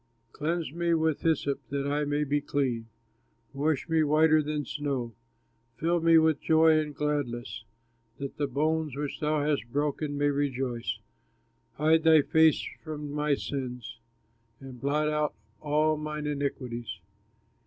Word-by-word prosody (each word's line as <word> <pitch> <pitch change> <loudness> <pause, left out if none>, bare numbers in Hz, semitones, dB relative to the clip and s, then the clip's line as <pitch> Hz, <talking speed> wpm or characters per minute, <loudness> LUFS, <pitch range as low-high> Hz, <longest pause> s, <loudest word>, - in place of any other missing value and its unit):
Cleanse 160 -1 -2
me 170 0 +1
with 160 -2 0
hyssop 145 -4 +1
that 140 0 -2
I 145 +1 0
may 145 +1 0
be 145 0 0
clean, 125 -6 -1 0.7
Wash 145 +1 0
me 160 -1 +2
whiter 155 +1 +4
than 150 -1 -3
snow. 135 -5 -3 0.6
Fill 170 +1 +1
me 165 0 +6
with 160 -2 +3
joy 160 -1 +5
and 150 -2 -4
gladness, 130 -6 -3 0.5
That 140 -1 -6
the 145 - 0
bones 155 +1 0
which 145 0 -4
thou 150 -1 0
hast 140 -6 -1
broken 145 +1 -1
may 145 0 +2
rejoice. 130 -4 -2 0.8
Hide 160 +2 +3
thy 160 -2 +6
face 160 +1 +4 0.2
from 150 -2 -6
my 150 0 +1
sins, 125 -5 -5 0.6
And 130 -3 -11
blot 150 +2 +1
out 150 -1 0 0.3
all 155 +1 +2
mine 150 0 -4
iniquities. 125 - -3
150 Hz, 140 wpm, -28 LUFS, 140-155 Hz, 0.8 s, me